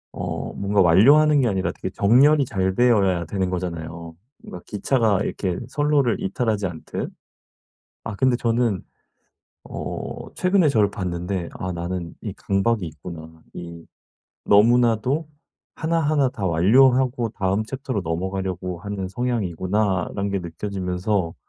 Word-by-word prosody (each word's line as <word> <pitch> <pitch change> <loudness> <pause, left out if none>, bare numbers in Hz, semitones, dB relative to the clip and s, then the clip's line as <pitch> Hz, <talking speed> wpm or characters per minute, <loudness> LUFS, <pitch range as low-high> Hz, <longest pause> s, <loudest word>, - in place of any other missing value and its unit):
어 - - -4
뭔가 100 +1 -1
완료하는 140 - +6
게 125 - +2
아니라 95 -4 0
되게 - - -6
정렬이 135 +8 +4
잘 95 -4 -1
되어야 100 -8 +3
되는 95 +2 -2
거잖아요. 85 -2 -5 0.3
뭔가 90 - -9
기차가 110 -1 +1
이렇게 95 -5 -2
선로를 145 -3 +1
이탈하지 105 0 -1
않듯. 85 -3 -6 0.9
아 105 - -5
근데 130 +3 +2
저는 115 -4 0 0.8
어 - - -6
최근에 185 -3 +3
저를 110 -7 +3
봤는데 90 -1 -3
'아 90 0 -3
나는 85 0 -4
이 - - -5
강박이 100 0 0
있구나. 80 +1 -10
이 85 -1 -9 0.6
너무나도 120 +7 +3 0.5
하나하나 155 -4 +1
다 105 -7 -4
완료를 115 +11 +5
하고 125 -3 0
다음 100 -1 -1
챕터로 130 -1 -4
넘어가려고 90 +1 -3
하는 100 0 -4
성향이구나.'라는 100 -2 -1
게 100 - 0
느껴지면서 90 +1 -2
100 Hz, 300 characters per minute, -23 LUFS, 90-120 Hz, 0.9 s, 완료하는